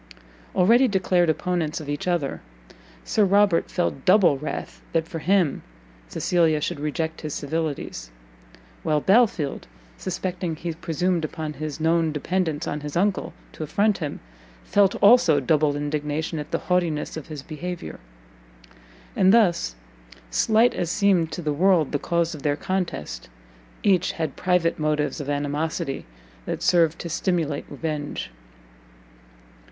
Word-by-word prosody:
Already 235 +8 +5
declared 185 -4 +2
opponents 165 -1 -1
of 155 - -8
each 145 +4 -3
other, 170 -6 -1 0.6
Sir 215 - +2
Robert 200 -2 +3
felt 155 -6 -2
double 185 -6 +5
wrath 150 +3 -6
that 165 -1 +1
for 165 - -5
him 180 -3 +2 0.5
Cecilia 165 - +2
should 155 +1 -3
reject 160 +2 -3
his 155 -2 -4
civilities; 150 - -3 0.7
while 155 -1 +1
Belfield, 190 - +2 0.3
suspecting 180 -2 -3
he 165 +1 -4
presumed 170 +1 -1
upon 155 0 -4
his 155 +1 -5
known 165 0 +2
dependence 160 0 -1
on 150 - -2
his 150 +1 -5
uncle 195 +1 0 0.2
to - - -11
affront 205 +7 +1
him, 150 -4 -4 0.4
felt 200 -1 +3
also 200 -9 +6
double 145 +2 +2
indignation 150 +2 -2
at 150 0 -6
the - - 0
haughtiness 175 -4 0
of 160 - -7
his 150 -4 -7
behaviour. 165 - -6 1.2
And 190 -1 +5
thus, 175 - +3 0.6
slight 220 - +3
as 170 - -2
seemed 185 -4 +2
to 175 - -5
the 150 -1 0
world 170 -1 +3
the 145 - 0
cause 170 +1 0
of 150 - -8
their 145 0 +1
contest, 170 - -3 0.5
each 185 -3 +3
had 160 -4 -3
private 180 -3 +1
motives 150 0 0
of 145 - -6
animosity 145 - -2 0.4
that - - -3
served 165 -2 +3
to - - -5
stimulate 165 -3 -1
revenge. 150 0 -4
160 Hz, 135 wpm, -24 LUFS, 150-180 Hz, 1.2 s, also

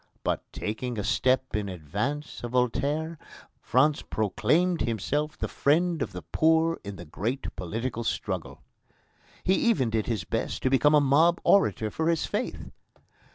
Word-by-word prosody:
But, - - 0
taking 115 +3 -4
a 105 - -2
step 130 +4 +1
in 105 -2 -2
advance 105 - -4
of 120 0 -5
Voltaire, 145 +6 0 0.4
France 145 +4 +2
proclaimed 165 - +1
himself 145 +8 -1
the - - -2
friend 165 +2 +1
of - - -2
the 90 -3 -8
poor 160 - +2
in 100 -1 -6
the 90 - -9
great 115 - -4
political 115 +6 -3
struggle." - - -3 0.8
He 185 - +3
even 160 - +2
did 110 -1 0
his 110 -7 -1
best - - -3
to 130 - +2
become 145 +3 +5
a - - +7
mob 155 +5 +4
orator 115 - +3
for 160 +7 0
his 165 -2 +1
faith. - - -4
130 Hz, 155 wpm, -27 LUFS, 110-160 Hz, 0.8 s, a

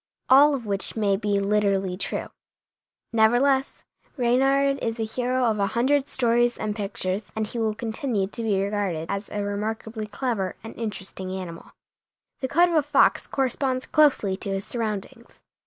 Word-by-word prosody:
All 280 +3 +7
of 245 -4 -6
which 200 -1 -1
may 205 -3 +2
be 205 0 0
literally 200 -2 +1
true, 185 - -3 0.8
nevertheless 245 +5 +3 0.3
Reynard 270 +3 +2
is 225 -1 -1
the 225 - -1
hero 250 +3 -1
of 220 -3 +1
a 200 - +2
hundred 280 +3 +2
stories 240 -1 +2
and 210 -1 -3
pictures 200 -2 -3
and 220 0 -1
he 235 +3 -5
will 220 -1 0
continue 225 -2 -1
to 205 +4 -5
be 210 -4 +1
regarded 195 -5 -2
as 200 +1 -4
a 205 -1 -3
remarkably 215 +2 -4
clever 210 -3 -2
and 225 - -9
interesting 195 -4 -5
animal. 185 -3 -7 0.7
The 260 - -2
coat 345 +6 +4
of - - -2
the 315 - +4
fox 290 0 +3
corresponds 260 0 -1
closely 280 -11 +3
to 200 - -4
his 195 +1 -2
surroundings. 230 +1 -5
220 Hz, 160 wpm, -25 LUFS, 200-255 Hz, 0.8 s, All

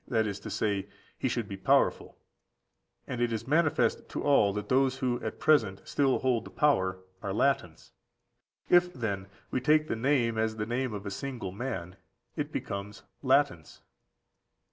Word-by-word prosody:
that 110 -2 +1
is 100 -2 -3
to - - -8
say, 100 -2 -1 0.3
he - - -1
should - - -2
be - - -5
powerful; - - +1 0.9
and 125 -2 -4
it 120 -1 +1
is 115 +1 -3
manifest 155 +2 +2
to - - -4
all 140 -8 +4
that 105 0 -4
those 130 +1 +2
who 125 -2 -1
at 110 - -4
present 115 -11 +3
still 135 -2 +2
hold 125 -3 +1
the - - -10
power 95 -11 +2 0.2
are 100 - -3
Latins. 110 - 0 0.8
If, 180 0 +5
then, 100 -5 -3 0.2
we 130 - 0
take 155 +2 +3
the - - -1
name 115 -2 +1
as 110 0 0
the 105 -1 -2
name 125 +2 -1
of 105 0 -6
a 100 - -4
single 120 -2 -5
man, 95 -5 -5 0.4
it - - -3
becomes 100 +1 -5 0.2
Latinus. 135 - +1
115 Hz, 165 wpm, -29 LUFS, 100-135 Hz, 0.9 s, If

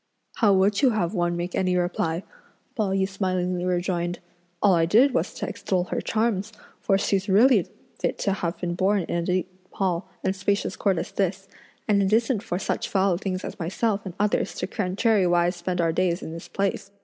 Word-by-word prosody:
"How 215 -3 +4
would 195 +3 +3
you 270 - +5
have 210 -6 0
one 175 -2 0
make 175 +1 -4
any 185 -1 +1
reply?" 175 -1 -1 0.5
Pao 215 -5 0
yü 190 0 +1
smilingly 185 -2 -1
rejoined; 175 -1 -1 0.4
"all 200 0 +4
I 165 -1 +3
did 250 +9 +5
was - - 0
to - - -4
extol 185 -2 -1
her - - -1
charms; 220 -2 0 0.3
for 195 - +2
she's 195 0 0
really 235 +7 +5 0.3
fit - - -1
to 200 - 0
have 175 -3 -3
been 175 -1 -2
born 190 +2 +1
in 170 - -2
a - - 0
deep 180 +1 -1 0.2
hall 185 -2 -1
and 190 - 0
spacious 200 +1 -1
court 195 -3 +1
as - - -3
this; 195 0 -1 0.4
and 205 -2 +3
it 195 0 +1
isn't 225 0 +2
for 180 -6 -3
such - - -2
foul 190 -2 +2
things 185 -1 -3
as - - -7
myself 200 +4 -1
and 185 -3 -7
others 210 0 0
to - - -2
contrariwise 185 -3 +2
spend 180 +1 -3
our 165 -1 +2
days 180 0 0
in - - -6
this 165 - -8
place!" 195 0 -2
190 Hz, 195 wpm, -25 LUFS, 175-200 Hz, 0.5 s, you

